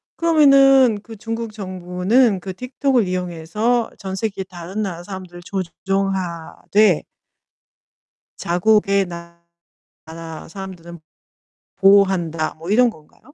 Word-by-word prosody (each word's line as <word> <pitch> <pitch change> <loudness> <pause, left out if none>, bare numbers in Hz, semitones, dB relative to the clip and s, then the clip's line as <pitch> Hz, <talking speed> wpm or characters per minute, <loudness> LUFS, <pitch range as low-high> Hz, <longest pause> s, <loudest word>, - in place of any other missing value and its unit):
그러면은 275 -8 +5
그 225 +1 -11
'중국 225 0 -5
정부는 185 +3 +1
그 190 +1 -7
TikTok을 250 -1 0
이용해서 185 +7 -1
전 190 -1 -6
세계 195 -2 -3
다른 185 +3 -6
나라 175 -3 -5
사람들을 185 -2 -9
조종하되' 190 0 -1 1.4
'자국의 200 +2 +2
나라 170 0 -13 0.8
사람들은 175 -2 -9 0.8
보호한다.' 190 -5 +3
뭐 165 +4 -8
이런 240 +2 +4
건가요? 155 -6 -20
190 Hz, 250 characters per minute, -20 LUFS, 175-220 Hz, 1.4 s, 그러면은